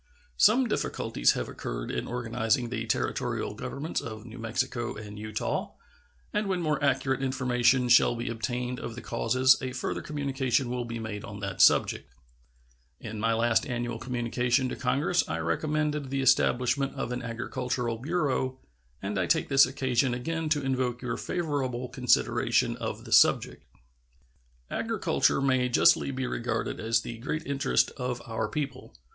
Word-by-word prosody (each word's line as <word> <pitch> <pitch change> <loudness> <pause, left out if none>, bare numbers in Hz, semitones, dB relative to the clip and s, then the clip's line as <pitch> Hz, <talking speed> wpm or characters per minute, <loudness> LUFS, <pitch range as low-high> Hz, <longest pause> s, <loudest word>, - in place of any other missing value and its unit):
Some 240 +5 +5
difficulties - - +1
have - - -3
occurred - - -5
in - - -3
organizing 120 +1 0
the 115 -1 -3
Territorial 110 - -1
governments 150 +4 -4
of 110 -4 -7
New 120 +1 -10
Mexico 120 +1 -2
and 105 -1 -8
Utah, 110 0 -3 0.6
and 210 0 0
when 190 -2 0
more 150 -4 -1
accurate 135 -1 +1
information 125 -1 +2
shall 120 0 +5
be 120 +1 -4
obtained 125 +2 -3
of 115 - -6
the 120 - -7
causes 130 +3 +3
a 130 -1 -4
further - - -3
communication 135 -4 -1
will 125 -1 -2
be 115 0 -5
made 110 -2 -5
on 100 0 -8
that 100 -2 -2
subject. - - +4 0.9
In 110 -1 -6
my 115 +1 +2
last 115 +4 +2
annual 120 -2 -3
communication 125 +1 0
to - - -4
Congress 140 +8 +1
I 80 - -1
recommended 150 - -1
the 135 0 -1
establishment 135 +1 +2
of 135 -2 -3
an 125 0 -3
agricultural 120 0 -3
bureau, 135 -3 -1 0.5
and 100 0 -2
I 90 - 0
take - - +1
this 135 -1 +6
occasion 130 -2 0
again 160 +5 -3
to 150 -2 +1
invoke 130 -2 -1
your 120 -2 -2
favorable 135 -7 -2
consideration 125 -1 +2
of - - -5
the - - -10
subject. - - +4 1.0
Agriculture - - +1
may 130 -2 +2
justly 120 - +4
be 130 -1 -2
regarded 120 -2 -2
as 115 0 +1
the 115 0 -7
great 150 +6 -3
interest 140 +1 +1
of 125 -2 -3
our 110 -1 -2
people. 150 -2 -5
125 Hz, 155 wpm, -28 LUFS, 115-135 Hz, 1.0 s, this